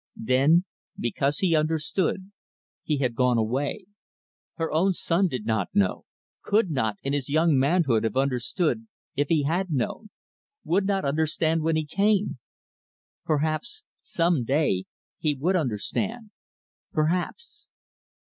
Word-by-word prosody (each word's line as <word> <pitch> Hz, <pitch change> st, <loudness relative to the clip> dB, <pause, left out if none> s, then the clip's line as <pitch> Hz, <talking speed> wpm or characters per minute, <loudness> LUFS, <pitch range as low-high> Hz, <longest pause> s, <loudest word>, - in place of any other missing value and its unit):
Then 140 Hz, +9 st, +3 dB, 0.3 s
because 135 Hz, +5 st, 0 dB
he 180 Hz, -4 st, +2 dB
understood 160 Hz, +5 st, 0 dB, 0.5 s
he 150 Hz, -, -1 dB
had 125 Hz, -3 st, 0 dB
gone 125 Hz, 0 st, +2 dB
away. 135 Hz, -, -1 dB, 0.7 s
Her 165 Hz, -2 st, -2 dB
own 185 Hz, +5 st, +3 dB
son 175 Hz, +2 st, +1 dB
did 125 Hz, -9 st, -4 dB
not 110 Hz, -4 st, 0 dB
know 100 Hz, -2 st, +1 dB, 0.4 s
could 205 Hz, -4 st, +1 dB
not, 110 Hz, -8 st, 0 dB
in 140 Hz, -, -1 dB
his 145 Hz, -2 st, -1 dB
young 160 Hz, +1 st, +3 dB
manhood, 135 Hz, -4 st, +2 dB
have 110 Hz, +2 st, -1 dB
understood, 140 Hz, -, 0 dB, 0.3 s
if 145 Hz, 0 st, +1 dB
he 155 Hz, -2 st, +2 dB
had 175 Hz, +6 st, 0 dB
known 155 Hz, -, -2 dB, 0.5 s
would 195 Hz, +3 st, +1 dB
not 195 Hz, -4 st, 0 dB
understand 160 Hz, +2 st, +1 dB
when 160 Hz, +1 st, +1 dB
he 155 Hz, -1 st, 0 dB
came. 200 Hz, -1 st, +1 dB, 0.9 s
Perhaps, 155 Hz, -, -1 dB, 0.2 s
some 170 Hz, -6 st, +1 dB
day, 130 Hz, -8 st, +1 dB, 0.3 s
he 150 Hz, -2 st, +1 dB
would 170 Hz, +8 st, 0 dB
understand 205 Hz, -, -2 dB, 0.6 s
perhaps. 180 Hz, -, -2 dB
155 Hz, 130 wpm, -26 LUFS, 135-180 Hz, 0.9 s, Then